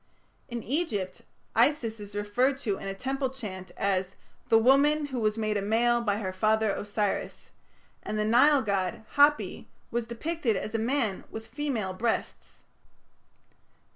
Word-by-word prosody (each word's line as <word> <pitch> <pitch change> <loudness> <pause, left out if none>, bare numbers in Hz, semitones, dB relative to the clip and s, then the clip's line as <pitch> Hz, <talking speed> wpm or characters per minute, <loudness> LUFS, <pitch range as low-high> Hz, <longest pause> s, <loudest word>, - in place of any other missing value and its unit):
In 235 -2 -4
Egypt 220 - -2 0.3
Isis 230 -7 +2
is 205 0 -9
referred 245 +7 +1
to 205 -7 -1
in - - -6
a 195 - -2
temple 265 +4 -2
chant 200 -8 -7
as 190 -1 0 0.3
"the 225 - +6
woman 280 +6 +4
who 260 -3 -4
was 215 -1 +1
made 215 -1 0
a - - -1
male 235 +3 +2
by 205 -3 0
her 190 -3 -3
father 215 +2 +2
Osiris", 205 0 -3 0.5
and 215 - -4
the 210 - +1
Nile 265 +6 +5
god 195 0 -1
Hapi 290 +1 +3 0.2
was 235 -1 -2
depicted 245 0 -1
as 215 +3 -4
a 225 - 0
man 230 -4 0
with 220 0 -7
female 230 -6 -3
breasts. 225 +4 -2
225 Hz, 150 wpm, -28 LUFS, 205-260 Hz, 0.5 s, the